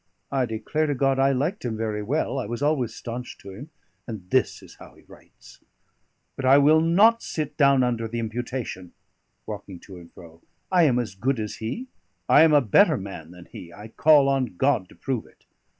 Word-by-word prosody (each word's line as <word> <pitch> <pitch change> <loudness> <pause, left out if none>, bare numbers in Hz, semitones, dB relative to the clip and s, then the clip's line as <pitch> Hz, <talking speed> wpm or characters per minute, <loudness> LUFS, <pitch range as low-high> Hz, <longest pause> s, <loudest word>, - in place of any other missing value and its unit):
I 130 -3 0
declare 115 +8 -2
to 145 - -1
God 135 0 +1
I 135 +1 +3
liked 145 +10 -2
him 115 -3 -3
very 110 -1 -3
well; 135 +3 -2
I 125 - -4
was 120 +5 -4
always 140 -6 0
staunch 120 +1 -7
to 100 - -12
him; 125 +11 -10 0.4
and 105 -6 -8
this 130 - 0
is - - -15
how - - -15
he - - -21
writes! - - -18 0.8
But 135 - -6
I 130 +2 +6
will 150 +3 +5
not 205 +8 +4
sit 155 -2 -5
down 140 -3 +4
under 120 -2 -1
the 115 +2 -6
imputation" 115 -5 -5 0.5
walking 100 -4 -8
to 95 -2 -12
and 85 -1 -14
fro 85 -1 -15 0.3
"I 180 -3 +4
am 130 -5 +2
as 115 -6 -3
good 120 +6 -1
as 105 -1 -5
he; 120 - -5 0.4
I - - +6
am 160 -1 +6
a 145 -1 +5
better 155 - +4
man 95 -6 -8
than 90 0 -14
he, 85 - -12
I 105 +4 -11
call 145 +3 +4
on 135 -7 -1
God 125 -8 +1
to - - -17
prove 130 -5 -4
it! - - -26
125 Hz, 205 wpm, -24 LUFS, 105-140 Hz, 0.8 s, I